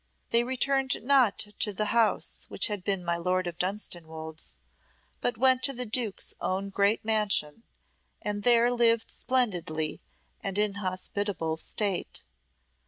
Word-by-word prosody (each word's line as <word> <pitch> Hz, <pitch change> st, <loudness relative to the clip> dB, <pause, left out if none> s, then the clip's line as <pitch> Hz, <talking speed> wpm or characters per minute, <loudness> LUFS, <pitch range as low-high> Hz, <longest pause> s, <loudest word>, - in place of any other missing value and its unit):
They 235 Hz, +1 st, +4 dB
returned 265 Hz, +1 st, +1 dB
not 255 Hz, -5 st, +4 dB, 0.2 s
to 210 Hz, -, +1 dB
the 215 Hz, +2 st, -1 dB
house 230 Hz, -2 st, +1 dB
which -, -, +1 dB
had 205 Hz, -3 st, -3 dB
been 195 Hz, -2 st, -2 dB
my 170 Hz, 0 st, 0 dB
Lord 180 Hz, +1 st, 0 dB
of 175 Hz, -1 st, -5 dB
Dunstanwolde's, 160 Hz, -5 st, -4 dB, 0.7 s
but 245 Hz, -, -1 dB
went 260 Hz, +1 st, +4 dB
to 275 Hz, -, +1 dB
the 250 Hz, 0 st, -4 dB
duke's 225 Hz, -2 st, -1 dB
own 195 Hz, +1 st, -2 dB
great 200 Hz, +3 st, +2 dB
mansion, 210 Hz, -6 st, +2 dB, 0.6 s
and 205 Hz, 0 st, -3 dB
there 240 Hz, +1 st, +5 dB
lived 230 Hz, -2 st, +3 dB
splendidly 175 Hz, -11 st, -1 dB, 0.4 s
and 195 Hz, 0 st, -3 dB
in 210 Hz, -1 st, +2 dB
hospitable 185 Hz, -2 st, -2 dB
state. 200 Hz, +2 st, 0 dB
205 Hz, 135 wpm, -28 LUFS, 185-235 Hz, 0.7 s, there